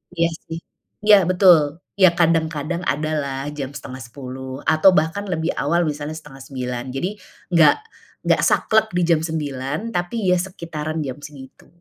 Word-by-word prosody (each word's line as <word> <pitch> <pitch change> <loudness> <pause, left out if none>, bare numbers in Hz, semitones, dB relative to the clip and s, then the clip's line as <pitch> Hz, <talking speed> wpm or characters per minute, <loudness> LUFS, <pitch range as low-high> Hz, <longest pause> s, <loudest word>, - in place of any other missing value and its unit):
Iya, 170 0 +2 0.2
sih. 165 - -5 0.5
Iya, 205 -4 +6
betul! 175 -4 +4 0.2
Iya, 185 -3 +7
kadang-kadang, 165 0 +1
ada 155 +2 -1
lah, 135 -1 -4
jam 140 -2 -6
9.30, 130 0 -8
atau 160 +4 +5
bahkan 160 +6 0
lebih 165 -2 -1
awal, 170 +4 +1
misalnya 150 0 -3
8.30. 135 -4 -6
Jadi, 175 +8 -1 0.4
enggak 165 -3 +6 0.5
enggak - - +3
saklek 220 0 +3
di 180 - +2
jam 165 -2 +3
9.00, 150 - -3
tapi, 175 +2 -2
ya 180 - +4
sekitaran 165 -4 -5
jam 130 -1 -5
segitu. 140 -2 -12
155 Hz, 140 wpm, -21 LUFS, 140-175 Hz, 0.5 s, Iya